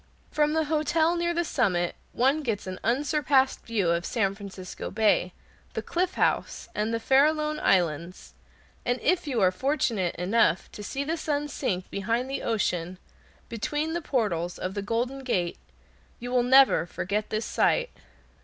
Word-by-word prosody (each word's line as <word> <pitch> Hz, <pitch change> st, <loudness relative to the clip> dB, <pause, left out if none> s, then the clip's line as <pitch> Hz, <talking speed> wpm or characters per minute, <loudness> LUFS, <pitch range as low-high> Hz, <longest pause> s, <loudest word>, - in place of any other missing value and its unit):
From 300 Hz, 0 st, +2 dB
the 320 Hz, 0 st, +2 dB
hotel 315 Hz, +2 st, +1 dB
near 345 Hz, 0 st, 0 dB
the 345 Hz, 0 st, 0 dB
summit 185 Hz, -, 0 dB, 0.2 s
one 270 Hz, +5 st, +2 dB
gets 225 Hz, -8 st, -2 dB
an 185 Hz, 0 st, -6 dB
unsurpassed 265 Hz, +2 st, +2 dB
view 205 Hz, -7 st, +1 dB
of 170 Hz, 0 st, 0 dB
San 195 Hz, -1 st, 0 dB
Francisco 195 Hz, -2 st, -8 dB
Bay, 210 Hz, -4 st, +2 dB, 0.4 s
the -, -, -3 dB
Cliff 365 Hz, +1 st, -1 dB
House, -, -, 0 dB
and 215 Hz, +2 st, -1 dB
the 230 Hz, -, -1 dB
Farallone 300 Hz, +4 st, +2 dB
Islands; 170 Hz, -1 st, 0 dB, 0.5 s
and 245 Hz, +1 st, 0 dB
if 345 Hz, -1 st, +1 dB
you 255 Hz, -5 st, 0 dB
are 185 Hz, -1 st, +5 dB
fortunate 230 Hz, -, 0 dB
enough 180 Hz, -1 st, +1 dB
to -, -, -9 dB
see 270 Hz, +7 st, -3 dB
the 320 Hz, +4 st, -2 dB
sun 295 Hz, -2 st, -1 dB
sink 185 Hz, -11 st, -3 dB
behind 230 Hz, +6 st, -1 dB
the 275 Hz, -, -2 dB
ocean, 180 Hz, -6 st, -1 dB, 0.5 s
between 295 Hz, +8 st, -2 dB
the 345 Hz, -, -2 dB
portals 200 Hz, -, -1 dB
of 185 Hz, -, -4 dB
the 200 Hz, -, -3 dB
Golden 235 Hz, +6 st, -2 dB
Gate, 180 Hz, -9 st, -1 dB, 0.6 s
you 245 Hz, 0 st, -6 dB
will 250 Hz, -1 st, +3 dB
never 260 Hz, -7 st, +5 dB
forget 205 Hz, +5 st, -3 dB
the 215 Hz, -, -1 dB
sight. -, -, +1 dB
235 Hz, 160 wpm, -27 LUFS, 190-295 Hz, 0.6 s, are